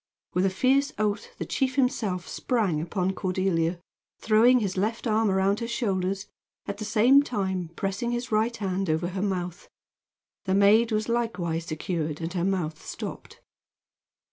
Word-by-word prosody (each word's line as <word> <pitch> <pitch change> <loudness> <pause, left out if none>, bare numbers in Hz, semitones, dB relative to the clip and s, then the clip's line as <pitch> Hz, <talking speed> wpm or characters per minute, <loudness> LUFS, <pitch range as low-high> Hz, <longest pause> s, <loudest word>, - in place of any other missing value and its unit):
With 185 +2 +2
a - - +2
fierce 265 +8 +2
oath 210 -1 -2
the - - -4
chief 265 -2 -1
himself 230 - 0
sprang 205 - 0
upon 180 +3 -1
Cordelia, 185 -3 0 0.4
throwing 230 +3 +5
his 200 -5 -2
left 215 +6 -1
arm 220 -1 +2
around 195 +2 +2
her 230 - -3
shoulders, 195 -4 -1 0.4
at 200 0 -5
the 215 - -4
same 240 +6 +5
time 190 - -2
pressing 200 +4 -2
his 240 +1 -3
right 225 +2 +1
hand 195 -2 -2
over 160 +3 0
her 190 0 -4
mouth. 180 -3 -3 0.8
The 190 0 +1
maid 215 +4 +5
was 215 0 0
likewise 195 -9 -1
secured 155 -1 -3
and 165 +1 -4
her 175 -2 -1
mouth 175 -5 -1
stopped. - - -7
195 Hz, 155 wpm, -26 LUFS, 180-230 Hz, 0.8 s, throwing